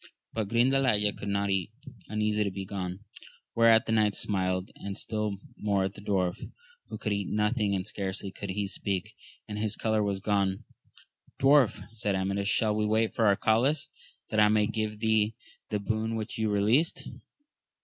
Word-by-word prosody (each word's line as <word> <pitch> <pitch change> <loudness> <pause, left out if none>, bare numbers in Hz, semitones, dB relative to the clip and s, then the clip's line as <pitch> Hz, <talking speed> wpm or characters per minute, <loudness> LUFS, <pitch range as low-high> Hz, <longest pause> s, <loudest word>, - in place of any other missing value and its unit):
But 110 -2 -1
Grindalaya 120 -3 +3
could 100 - -7
not 100 0 0
eat, 95 -1 0 0.4
uneasy 105 0 0
to 100 - -1
be 95 0 -6
gone; 95 -1 -5 0.5
whereat 115 -1 +5
the - - -2
knights 105 -2 +2
smiled, 95 -2 -1
and 100 0 -6
still 105 -3 -2 0.2
more 100 -2 +1
at 95 +1 -2
the 100 - -11
dwarf, 95 -3 -1 0.4
who - - -5
could 105 - -2
eat 100 -1 -2
nothing 105 -1 +1
and 95 -1 -2
scarcely 95 -1 -4
could 100 +1 -7
he 100 +2 -1
speak, 100 +2 -3 0.3
and 105 -1 -5
his 110 -1 -1
colour 110 -1 +1
was 100 -2 -1
gone. 100 +1 0 0.8
Dwarf, 135 -4 +4
said 105 -3 -2
Amadis, 100 +1 -1
shall 110 0 +2
we 105 - +1
wait 110 +1 +1
for 115 - +2
Arcalaus, 130 +9 +2 0.4
that 110 - +1
I 105 - +7
may 105 0 +3
give 110 -1 -2
thee 110 -1 +2 0.3
the 105 - 0
boon 110 +2 -1
which 110 0 -4
you 110 -1 +1
released 110 +10 +2
105 Hz, 170 wpm, -29 LUFS, 100-110 Hz, 0.8 s, I